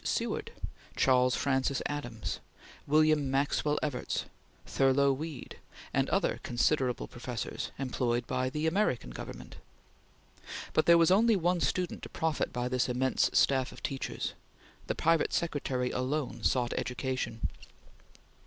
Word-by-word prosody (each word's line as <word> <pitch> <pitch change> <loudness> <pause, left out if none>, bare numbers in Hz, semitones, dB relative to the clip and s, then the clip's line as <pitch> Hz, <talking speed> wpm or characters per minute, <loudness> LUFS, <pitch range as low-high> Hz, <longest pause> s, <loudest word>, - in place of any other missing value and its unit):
Seward, - - -1 0.4
Charles 125 -1 +4
Francis 135 0 +1
Adams, 120 -7 -4 0.5
William 155 -1 +4
Maxwell 145 +2 +1
Evarts, 145 -5 -2 0.4
Thurlow 135 +1 +3
Weed, 150 0 -7 0.3
and - - +1
other - - +1
considerable 125 0 +1
professors 120 -1 -5
employed 120 -2 -1
by 130 +1 -1
the 150 +4 -2
American 160 - +1
Government; - - -8 1.2
but 155 - +2
there 170 0 +8
was 165 +1 +5
only 225 +3 +5
one 175 -1 +1
student 180 -2 -1
to - - -8
profit 160 -2 -1
by 125 0 -2
this 125 0 0
immense 130 +1 +2
staff 130 -2 +3
of - - -13
teachers. 135 -2 -3 0.5
The - - -1
private 165 -1 +2
secretary 135 -6 -1
alone 130 -2 -2
sought 125 +1 +1
education. 125 -2 -2
135 Hz, 125 wpm, -31 LUFS, 125-155 Hz, 1.2 s, there